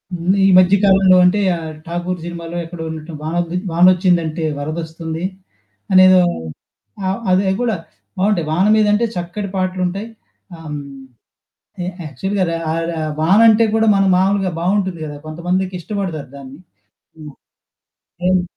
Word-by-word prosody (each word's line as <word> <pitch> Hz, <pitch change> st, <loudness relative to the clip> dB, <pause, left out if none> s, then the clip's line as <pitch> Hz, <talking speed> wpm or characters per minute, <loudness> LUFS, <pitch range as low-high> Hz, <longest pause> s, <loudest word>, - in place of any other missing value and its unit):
ముందు 175 Hz, +3 st, 0 dB
ఈ -, -, +5 dB
మధ్య 185 Hz, +1 st, +5 dB
కాలంలో 190 Hz, -2 st, +5 dB
అంటే 185 Hz, +3 st, +3 dB, 0.2 s
ఆ -, -, -4 dB, 0.3 s
'ఠాకూర్' 175 Hz, +1 st, -4 dB
సినిమాలో 170 Hz, 0 st, -6 dB
ఎక్కడ 165 Hz, -1 st, -9 dB
ఉన్నటు 160 Hz, +1 st, -7 dB
వానొద్ది 170 Hz, +2 st, -2 dB, 0.2 s
'వానొచ్చిందంటే 175 Hz, -2 st, +3 dB, 0.2 s
వరదొస్తుంది.' 160 Hz, +2 st, -5 dB, 0.7 s
అనేదో 185 Hz, 0 st, +7 dB, 0.9 s
ఆహ్, 190 Hz, +3 st, -1 dB
అదే 185 Hz, +2 st, +3 dB
అది 190 Hz, -, +1 dB
కూడా, 235 Hz, -3 st, 0 dB, 0.4 s
బావుంటయి. 190 Hz, -4 st, +1 dB
వాన 180 Hz, +5 st, +2 dB
మీదంటే 210 Hz, +1 st, +3 dB
చక్కటి 175 Hz, +4 st, -4 dB
పాటలుంటాయి. 185 Hz, +2 st, -2 dB, 0.5 s
ఆహ్, 165 Hz, -, -13 dB
హ్మ్. 150 Hz, -, -4 dB, 1.1 s
ఎ -, -, -4 dB, 0.2 s
యాక్చువల్‌గా 190 Hz, +8 st, -2 dB
ర -, -, -2 dB, 0.2 s
ఆరె 165 Hz, +1 st, -2 dB
అ -, -, -2 dB
వాన 180 Hz, +6 st, +4 dB
అంటే 220 Hz, +1 st, +5 dB
కూడా 225 Hz, 0 st, +2 dB
మన 195 Hz, -, +3 dB
మామూలుగా 195 Hz, 0 st, +1 dB
బావుంటుంది 190 Hz, -1 st, -1 dB
కదా! 145 Hz, -, -7 dB
కొంతమందికి 180 Hz, +4 st, -2 dB
ఇష్టపడతారు 175 Hz, -7 st, -4 dB
దాన్ని. 140 Hz, +2 st, -11 dB, 0.6 s
హ్మ్. 150 Hz, -2 st, -10 dB, 0.9 s
హ్మ్. 185 Hz, 0 st, +3 dB
180 Hz, 135 wpm, -18 LUFS, 165-190 Hz, 1.1 s, అనేదో